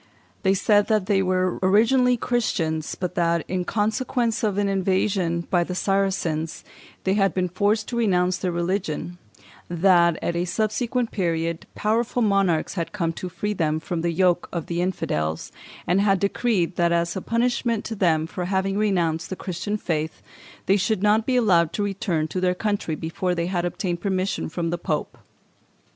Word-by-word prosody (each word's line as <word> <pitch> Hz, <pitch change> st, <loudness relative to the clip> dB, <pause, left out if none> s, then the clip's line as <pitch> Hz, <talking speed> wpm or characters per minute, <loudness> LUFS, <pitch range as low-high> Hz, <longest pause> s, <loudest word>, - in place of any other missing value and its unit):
They 190 Hz, 0 st, +3 dB
said 205 Hz, +1 st, +3 dB
that 215 Hz, -4 st, +2 dB
they 195 Hz, -1 st, +2 dB
were 185 Hz, -1 st, 0 dB
originally 240 Hz, +6 st, +4 dB
Christians; 165 Hz, -11 st, -1 dB
but 180 Hz, -1 st, -3 dB
that, 170 Hz, -1 st, +1 dB
in 180 Hz, -1 st, -2 dB
consequence 230 Hz, +2 st, 0 dB
of 205 Hz, -3 st, 0 dB
an 205 Hz, 0 st, +2 dB
invasion 190 Hz, -2 st, +1 dB
by 175 Hz, -2 st, +3 dB
the 180 Hz, +1 st, -5 dB
Saracens, 185 Hz, -5 st, -1 dB, 0.4 s
they 190 Hz, -, +2 dB
had 195 Hz, -1 st, +2 dB
been 185 Hz, -1 st, +1 dB
forced 205 Hz, +4 st, 0 dB
to 240 Hz, -, -3 dB
renounce 185 Hz, -5 st, +2 dB
their 185 Hz, -, -1 dB
religion; 175 Hz, -1 st, -2 dB, 0.5 s
that, 170 Hz, -1 st, +4 dB
at 170 Hz, -, -2 dB
a 175 Hz, +1 st, 0 dB
subsequent 225 Hz, +5 st, -1 dB
period, 165 Hz, -3 st, -1 dB
powerful 230 Hz, +3 st, 0 dB
monarchs 195 Hz, -6 st, +2 dB
had 170 Hz, -4 st, -4 dB
come 170 Hz, -5 st, -1 dB
to 180 Hz, -, -6 dB
free 195 Hz, +5 st, -3 dB
them 155 Hz, -4 st, 0 dB
from 165 Hz, +1 st, -3 dB
the 170 Hz, -, 0 dB
yoke 175 Hz, 0 st, +2 dB
of 170 Hz, -3 st, -3 dB
the 170 Hz, 0 st, -2 dB
infidels, 80 Hz, -, -2 dB, 0.3 s
and 185 Hz, +3 st, +2 dB
had 195 Hz, -2 st, +3 dB
decreed 200 Hz, -3 st, 0 dB
that, 170 Hz, -1 st, +3 dB
as 170 Hz, +1 st, +1 dB
a 190 Hz, -, -3 dB
punishment 235 Hz, 0 st, 0 dB
to 225 Hz, -, -4 dB
them 165 Hz, -5 st, +2 dB
for 180 Hz, +2 st, -5 dB
having 195 Hz, +1 st, 0 dB
renounced 170 Hz, -6 st, 0 dB
the 190 Hz, -, -3 dB
Christian 190 Hz, +4 st, -3 dB
faith, 160 Hz, -5 st, -3 dB, 0.4 s
they 195 Hz, -, +4 dB
should 195 Hz, +1 st, 0 dB
not 215 Hz, +1 st, +3 dB
be 260 Hz, -, +2 dB
allowed 180 Hz, -9 st, +3 dB
to 205 Hz, -, -1 dB
return 185 Hz, -5 st, -1 dB
to 185 Hz, -, -3 dB
their 180 Hz, 0 st, +2 dB
country 205 Hz, -5 st, -1 dB
before 175 Hz, +3 st, -2 dB
they 170 Hz, 0 st, -1 dB
had 175 Hz, -1 st, -1 dB
obtained 175 Hz, -1 st, -3 dB
permission 190 Hz, -1 st, -1 dB
from 165 Hz, 0 st, -2 dB
the 175 Hz, -, -2 dB
Pope. 155 Hz, -2 st, -3 dB
185 Hz, 175 wpm, -24 LUFS, 170-205 Hz, 0.5 s, originally